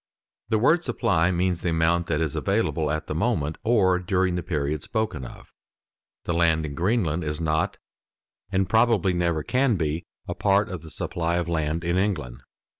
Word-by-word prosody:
The 110 Hz, -, +2 dB
word 155 Hz, +10 st, +3 dB
supply 90 Hz, -, +1 dB
means 90 Hz, -1 st, 0 dB
the 85 Hz, -, -1 dB
amount 85 Hz, +1 st, +1 dB
that 75 Hz, -1 st, 0 dB
is 80 Hz, -3 st, -1 dB
available 95 Hz, -6 st, 0 dB
at 75 Hz, +1 st, -2 dB
the -, -, -4 dB
moment 75 Hz, +2 st, -1 dB
or 95 Hz, -6 st, +3 dB
during 90 Hz, 0 st, 0 dB
the 90 Hz, -, -1 dB
period 75 Hz, -3 st, -2 dB
spoken 110 Hz, -, -2 dB
of. 60 Hz, -, -11 dB, 0.7 s
The 85 Hz, -, -2 dB
land 80 Hz, -2 st, +2 dB
in 70 Hz, -, -5 dB
Greenland 85 Hz, -1 st, 0 dB
is 75 Hz, 0 st, -3 dB
not, 85 Hz, +5 st, 0 dB, 0.7 s
and 95 Hz, -1 st, +1 dB
probably 110 Hz, -2 st, +3 dB
never 85 Hz, -3 st, 0 dB
can 125 Hz, -, +2 dB
be, 80 Hz, -1 st, -2 dB, 0.2 s
a -, -, -2 dB
part 100 Hz, 0 st, +2 dB
of 90 Hz, -3 st, -5 dB
the 80 Hz, -, -11 dB
supply 85 Hz, +1 st, -2 dB
of 85 Hz, -1 st, -1 dB
land 80 Hz, 0 st, -1 dB
in 85 Hz, +1 st, 0 dB
England. 75 Hz, -12 st, -2 dB
85 Hz, 180 wpm, -25 LUFS, 80-95 Hz, 0.7 s, word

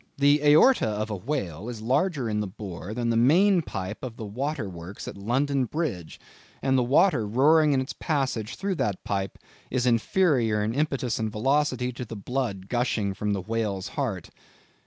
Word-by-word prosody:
"The 145 Hz, +1 st, +4 dB
aorta 150 Hz, -, +6 dB
of 110 Hz, +1 st, -2 dB
a -, -, -1 dB
whale 100 Hz, -, -4 dB
is 120 Hz, -3 st, -6 dB
larger 140 Hz, +2 st, +1 dB
in 105 Hz, -1 st, -1 dB
the 105 Hz, -, -1 dB
bore 95 Hz, -1 st, -7 dB
than 120 Hz, -1 st, 0 dB
the -, -, +1 dB
main 175 Hz, -, +5 dB
pipe 105 Hz, -, -5 dB
of 120 Hz, -3 st, -6 dB
the 110 Hz, -, -6 dB
water 130 Hz, +3 st, -3 dB
works 90 Hz, +2 st, -8 dB
at -, -, -6 dB
London 130 Hz, +6 st, 0 dB
Bridge, 120 Hz, -, -4 dB, 0.4 s
and 135 Hz, -1 st, +1 dB
the 130 Hz, -, +4 dB
water 125 Hz, -, +3 dB
roaring 150 Hz, +7 st, +4 dB
in 130 Hz, -, +2 dB
its 130 Hz, -, -5 dB
passage 130 Hz, -7 st, -2 dB
through 195 Hz, 0 st, -2 dB
that 100 Hz, -9 st, -1 dB
pipe 95 Hz, -1 st, -3 dB, 0.3 s
is 125 Hz, -1 st, 0 dB
inferior 120 Hz, -, +2 dB
in 110 Hz, +2 st, -1 dB
impetus 135 Hz, -4 st, -1 dB
and 110 Hz, -1 st, -1 dB
velocity 130 Hz, +2 st, +1 dB
to 125 Hz, -, -6 dB
the 115 Hz, -1 st, -7 dB
blood 105 Hz, -3 st, -3 dB
gushing 120 Hz, -5 st, 0 dB
from 105 Hz, +1 st, -2 dB
the 100 Hz, -, -2 dB
whale's 105 Hz, -1 st, -2 dB
heart." 115 Hz, -, -3 dB
120 Hz, 180 wpm, -26 LUFS, 105-140 Hz, 0.4 s, aorta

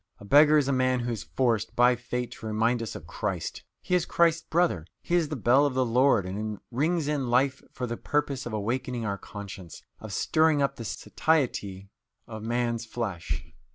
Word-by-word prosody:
A -, -, -12 dB
beggar 150 Hz, +6 st, +6 dB
is 145 Hz, -3 st, +2 dB
a -, -, +1 dB
man 130 Hz, -1 st, +2 dB
who 120 Hz, 0 st, -2 dB
is 115 Hz, -, -3 dB
forced, 115 Hz, -4 st, +1 dB
by 125 Hz, +1 st, +5 dB
fate, 125 Hz, 0 st, -4 dB
to 110 Hz, -, -8 dB
remind 115 Hz, +3 st, +1 dB
us 115 Hz, -, -5 dB
of -, -, -8 dB
Christ; -, -, -4 dB, 0.2 s
he -, -, -3 dB
is 180 Hz, -2 st, +2 dB
Christ's 170 Hz, -1 st, +3 dB
brother; 160 Hz, -, 0 dB, 0.2 s
he -, -, -4 dB
is 170 Hz, -4 st, +3 dB
the 155 Hz, -, -3 dB
bell 130 Hz, +3 st, +4 dB
of 135 Hz, -, -4 dB
the 130 Hz, -1 st, +2 dB
Lord, 120 Hz, -3 st, +3 dB
and 105 Hz, +3 st, -4 dB
rings 155 Hz, +5 st, 0 dB
in 145 Hz, -4 st, -1 dB
life 130 Hz, +3 st, +2 dB
for 125 Hz, -, -4 dB
the 120 Hz, -1 st, -4 dB
purpose 140 Hz, -3 st, -1 dB
of -, -, -5 dB
awakening 120 Hz, +3 st, -2 dB
our 100 Hz, -2 st, -2 dB
conscience, 100 Hz, -4 st, -9 dB, 0.2 s
of 110 Hz, -, -8 dB
stirring 155 Hz, +7 st, +2 dB
up 140 Hz, -1 st, 0 dB
the 115 Hz, -, -6 dB
satiety 100 Hz, -8 st, -1 dB, 0.3 s
of 110 Hz, -1 st, -8 dB
man's 115 Hz, 0 st, -1 dB
flesh. 85 Hz, -11 st, -4 dB
120 Hz, 195 wpm, -27 LUFS, 110-140 Hz, 0.3 s, beggar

